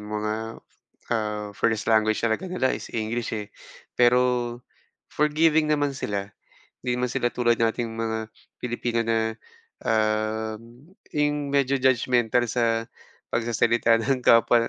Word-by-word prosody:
mga, 105 0 -3 0.8
ah, 105 -2 -2
first 110 +2 0
language 110 -1 +3
talaga 115 +12 0
nila 155 -8 0
is - - -5
English, 115 +1 -2
eh. 105 -1 -7 0.4
Pero 125 0 +2 0.5
forgiving 155 +1 +3
naman 145 -2 +1
sila, 100 -6 -4 0.5
'di 125 -1 0
naman 125 0 0
sila 120 0 -1
tulad 120 -1 +2
nating 115 +1 0
mga 110 -1 -2 0.3
Pilipino 120 -1 -1
na, 110 -1 0 0.5
um, 110 - -2 0.2
'yong 145 -1 0
medyo 140 -1 +1
judgemental 125 -2 +2
sa 115 -1 +1 0.5
pagsasalita 115 0 +2
ng 130 +2 0
kapwa 115 -1 +4
115 Hz, 120 wpm, -25 LUFS, 110-125 Hz, 0.8 s, kapwa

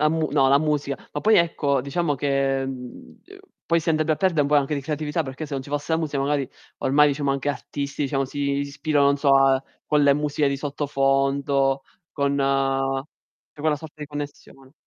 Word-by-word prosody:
La 150 - +4
mu 160 0 0
no, 135 -2 +3
la 140 +1 +5
musica. 145 -2 -1 0.2
Ma 145 - -3
poi 220 +5 +4
ecco, 145 -5 +2
diciamo 145 +3 -1
che, 135 0 0
mhmm, 125 -2 -9
uhm, - - -14 0.3
poi 170 0 +2
si 165 - -5
andrebbe 155 0 +2
a - - -1
perde 185 -4 +1
un 145 - +2
po' 150 - +1
anche 145 +1 +2
di 140 - -2
creatività, 150 +2 -2
perché 130 +3 -6
se 145 - -6
non 135 - -3
ci 140 - -12
fosse 145 +2 -2
la 160 - +3
musica 150 -3 -2
magari, 140 -1 0 0.3
ormai 150 +2 +4
diciamo 140 0 -1
anche 140 +1 -2
artisti, 140 +1 -4
diciamo, 135 -1 0
si 135 +2 -8 0.2
ispira, 145 +1 -1
non 140 0 +4
so, 140 -1 +3
a 135 -1 +4 0.2
con 150 -1 +3
le 140 -1 +5
musiche 150 0 0
di 140 - -1
sottofondo, 135 -1 0 0.3
con 140 -1 0
c'è 135 +1 -2
quella 150 0 +1
sorta 155 +1 -11
di 150 - -5
connessione. 145 -2 -9
140 Hz, 205 wpm, -23 LUFS, 135-150 Hz, 0.3 s, la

